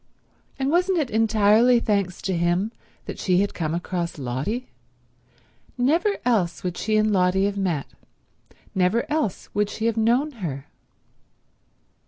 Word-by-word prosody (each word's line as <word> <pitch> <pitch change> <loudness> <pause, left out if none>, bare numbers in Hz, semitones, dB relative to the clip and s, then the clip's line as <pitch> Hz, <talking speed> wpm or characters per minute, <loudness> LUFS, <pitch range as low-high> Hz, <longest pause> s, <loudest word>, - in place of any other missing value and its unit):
And 270 +1 0
wasn't 360 +2 +2
it 295 -6 -1
entirely 220 +2 +4
thanks 200 -5 -1
to 190 - -1
him 175 +5 +1 0.3
that - - -7
she 185 0 +2
had 200 - -1
come 160 -1 -2
across 175 -1 -3
Lotty? 140 - -3 1.1
Never 330 +11 +2
else 200 -9 +1
would 180 -1 -2
she 215 +3 0
and 215 0 +2
Lotty 185 +1 +3
have 200 0 -1
met; 180 -8 -1 0.9
never 190 +5 +2
else 300 - -1
would 205 0 +1
she 220 - -4
have 230 -1 +1
known 240 +7 +2
her. 155 - -5
205 Hz, 140 wpm, -24 LUFS, 180-235 Hz, 1.1 s, entirely